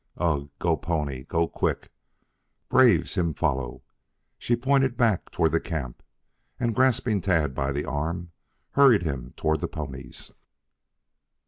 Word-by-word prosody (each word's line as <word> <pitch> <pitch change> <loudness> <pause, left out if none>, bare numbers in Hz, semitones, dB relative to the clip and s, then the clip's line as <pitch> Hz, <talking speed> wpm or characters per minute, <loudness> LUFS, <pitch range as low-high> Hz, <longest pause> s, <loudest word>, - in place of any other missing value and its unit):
"Ugh! 70 -5 0
Go 85 -2 +1
pony. 75 -6 -3
Go 85 -1 0
quick. - - -2 0.8
Braves 115 -11 +4
him 85 -5 0
follow." 65 -6 -2 0.6
She 120 - +1
pointed 135 0 +1
back 115 -7 +1
toward 80 -3 +1
the 80 - +2
camp, 70 -9 -5 0.6
and, 120 -1 0
grasping 115 -4 +2
Tad 80 -7 +1
by 70 +1 -1
the 70 +2 -2
arm, 85 +5 -3 0.4
hurried 135 -9 +5
him 65 -6 -4
toward 80 0 +1
the 85 - -2
ponies. 70 -4 -7
85 Hz, 130 wpm, -26 LUFS, 70-105 Hz, 0.8 s, hurried